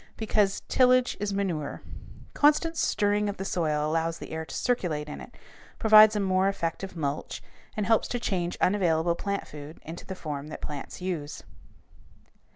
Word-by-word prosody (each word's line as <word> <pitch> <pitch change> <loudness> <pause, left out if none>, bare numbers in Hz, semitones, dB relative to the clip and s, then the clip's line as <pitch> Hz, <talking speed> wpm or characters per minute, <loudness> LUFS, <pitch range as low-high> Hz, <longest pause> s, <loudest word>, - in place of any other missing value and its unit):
Because 210 -3 +1
"tillage 255 -1 +4
is 205 0 -2
manure." 180 -7 -3 0.5
Constant 305 +3 +3
stirring 205 -7 +1
of 200 - -5
the 195 - -4
soil 155 -5 0
allows 165 +1 0
the - - -9
air 160 0 -4
to - - -8
circulate 170 -12 -1
in 150 - -7
it, - - -13 0.4
provides 215 -1 +7
a - - +1
more 190 -1 +2
effective 190 0 -4
mulch, 145 -2 -3 0.3
and 210 - 0
helps 225 0 +3
to 245 - -2
change 180 -6 -2
unavailable 170 -4 +2
plant 200 +3 -3
food 150 +1 -10
into 165 +2 -8
the 190 - -5
form 150 -4 -5
that 155 - -7
plants 145 +4 -7
use. 160 -6 -4
185 Hz, 160 wpm, -27 LUFS, 160-210 Hz, 0.5 s, provides